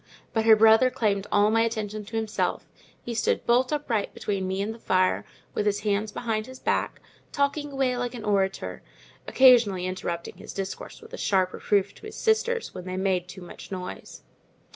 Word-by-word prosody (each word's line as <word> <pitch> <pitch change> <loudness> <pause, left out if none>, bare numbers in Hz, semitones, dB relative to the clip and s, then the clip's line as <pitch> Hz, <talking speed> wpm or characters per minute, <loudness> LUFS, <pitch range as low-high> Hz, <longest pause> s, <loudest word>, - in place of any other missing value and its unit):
But 225 -1 +1
her 220 -1 +8
brother 225 +3 +6
claimed 205 -5 0
all 205 +1 +4
my 225 +1 +3
attention 215 -2 -2
to 225 - -8
himself; 220 -1 -1 0.4
he 240 - -3
stood 225 - 0
bolt 250 +3 +3
upright 255 -9 -1
between 195 -2 -2
me 190 +1 -2
and 210 +3 -2
the 230 - -13
fire, 185 -3 +1 0.3
with 210 - -1
his 205 0 +1
hands 210 0 0
behind 220 -2 -2
his 260 0 -10
back, - - -1 0.3
talking 285 +1 -1
away 265 -2 0
like 245 0 -3
an 230 - -7
orator, 195 -2 -1 0.5
occasionally 235 -8 +5
interrupting 175 -2 -4
his - - -9
discourse 195 - -6
with 450 +2 -15
a - - -5
sharp 185 -2 +1
reproof 200 -1 0
to 435 - -11
his 430 - -10
sisters 465 +1 0
when 180 -1 -8
they 185 0 -4
made 185 -2 0
too 185 - -10
much 175 - -11
noise. 185 -1 -7
215 Hz, 185 wpm, -26 LUFS, 195-245 Hz, 0.5 s, her